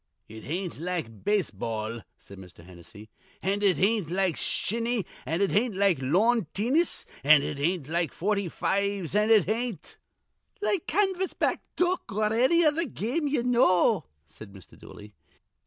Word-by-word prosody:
"It 110 Hz, 0 st, -11 dB
ain't 175 Hz, +2 st, -4 dB
like 165 Hz, -, -5 dB
base 205 Hz, -4 st, +1 dB
ball," 110 Hz, +2 st, -4 dB, 0.2 s
said 100 Hz, -1 st, -14 dB
Mr. 90 Hz, -2 st, -14 dB
Hennessy, 95 Hz, +4 st, -14 dB, 0.3 s
"an' 200 Hz, +2 st, 0 dB
it 195 Hz, -6 st, +3 dB
ain't 200 Hz, -3 st, +1 dB
like 185 Hz, -2 st, 0 dB
shinny, 230 Hz, -1 st, -1 dB, 0.2 s
an' 165 Hz, +4 st, -1 dB
it 200 Hz, -, +2 dB
ain't 220 Hz, +1 st, +1 dB
like 195 Hz, -5 st, +2 dB
lawn 200 Hz, -, +2 dB
teenis, 265 Hz, -, +1 dB, 0.2 s
an' 145 Hz, 0 st, +6 dB
it 140 Hz, -, -4 dB
ain't 165 Hz, -1 st, -1 dB
like 170 Hz, 0 st, -1 dB
forty 200 Hz, 0 st, -1 dB
fives, 200 Hz, -1 st, -1 dB
an' 210 Hz, +1 st, +2 dB
it 215 Hz, -7 st, +5 dB
ain't" 230 Hz, -1 st, -4 dB, 0.6 s
"Like 405 Hz, -4 st, -1 dB
canvas 380 Hz, +1 st, 0 dB
back -, -, 0 dB
duck 360 Hz, -7 st, 0 dB
or 215 Hz, +2 st, 0 dB
anny 290 Hz, +9 st, +4 dB
other 310 Hz, +3 st, +2 dB
game 255 Hz, -, -2 dB
ye 280 Hz, -4 st, 0 dB
know," 235 Hz, -, +3 dB, 0.2 s
said 100 Hz, +7 st, -13 dB
Mr. 95 Hz, -4 st, -15 dB
Dooley. 105 Hz, 0 st, -13 dB
195 Hz, 155 wpm, -27 LUFS, 150-235 Hz, 0.6 s, an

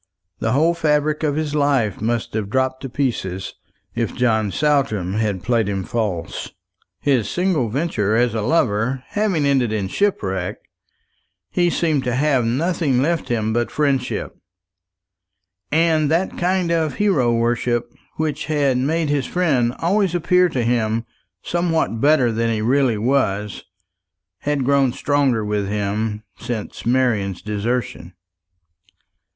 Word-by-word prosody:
The 115 Hz, -, 0 dB
whole 160 Hz, +5 st, +3 dB
fabric 150 Hz, -2 st, +1 dB
of 150 Hz, -3 st, 0 dB
his 155 Hz, -1 st, -2 dB
life 140 Hz, -9 st, +1 dB
must 115 Hz, +1 st, -1 dB
have 105 Hz, -2 st, -2 dB
dropped 130 Hz, +2 st, 0 dB
to 135 Hz, -, -5 dB
pieces 115 Hz, -8 st, -2 dB, 0.4 s
if -, -, -2 dB
John 110 Hz, -4 st, +1 dB
Saltram 135 Hz, -11 st, +1 dB
had 105 Hz, -4 st, -1 dB
played 115 Hz, -4 st, +1 dB
him 95 Hz, -1 st, -2 dB
false. 100 Hz, -7 st, -3 dB, 0.5 s
His 125 Hz, -7 st, +1 dB
single 175 Hz, -, 0 dB
venture 110 Hz, -6 st, 0 dB
as 120 Hz, 0 st, +2 dB
a 110 Hz, -, -1 dB
lover 125 Hz, -1 st, +1 dB
having 200 Hz, -8 st, 0 dB
ended 135 Hz, -5 st, +2 dB
in 100 Hz, -3 st, -2 dB
shipwreck, 95 Hz, -, -1 dB, 0.9 s
he 175 Hz, -1 st, +2 dB
seemed 155 Hz, -5 st, 0 dB
to 125 Hz, -1 st, 0 dB
have 135 Hz, -3 st, +2 dB
nothing 140 Hz, +2 st, +1 dB
left 165 Hz, +2 st, 0 dB
him 110 Hz, -2 st, 0 dB
but 120 Hz, +1 st, 0 dB
friendship; 140 Hz, -4 st, -1 dB, 1.4 s
and 155 Hz, -1 st, +3 dB
that 170 Hz, +4 st, 0 dB
kind 180 Hz, -1 st, 0 dB
of 160 Hz, -3 st, 0 dB
hero 160 Hz, -13 st, +2 dB
worship 120 Hz, 0 st, 0 dB, 0.2 s
which 155 Hz, -2 st, -2 dB
had 145 Hz, -4 st, +1 dB
made 155 Hz, +4 st, 0 dB
his 140 Hz, -3 st, 0 dB
friend 140 Hz, -10 st, +1 dB
always 185 Hz, +1 st, +1 dB
appear 180 Hz, +1 st, +3 dB
to 130 Hz, -6 st, -1 dB
him 115 Hz, -1 st, 0 dB, 0.4 s
something 165 Hz, -9 st, 0 dB
better 140 Hz, -3 st, +4 dB
than 115 Hz, +1 st, 0 dB
he 110 Hz, -1 st, -1 dB
really 130 Hz, -1 st, +2 dB
was, 105 Hz, -4 st, 0 dB, 0.7 s
had 145 Hz, -3 st, -1 dB
grown 135 Hz, -2 st, +3 dB
stronger 140 Hz, -7 st, +1 dB
with 105 Hz, -1 st, -1 dB
him 105 Hz, +1 st, -2 dB, 0.2 s
since 115 Hz, -1 st, -5 dB
Marian's 110 Hz, -7 st, +1 dB
desertion. 105 Hz, -3 st, -3 dB
125 Hz, 135 wpm, -21 LUFS, 110-150 Hz, 1.4 s, better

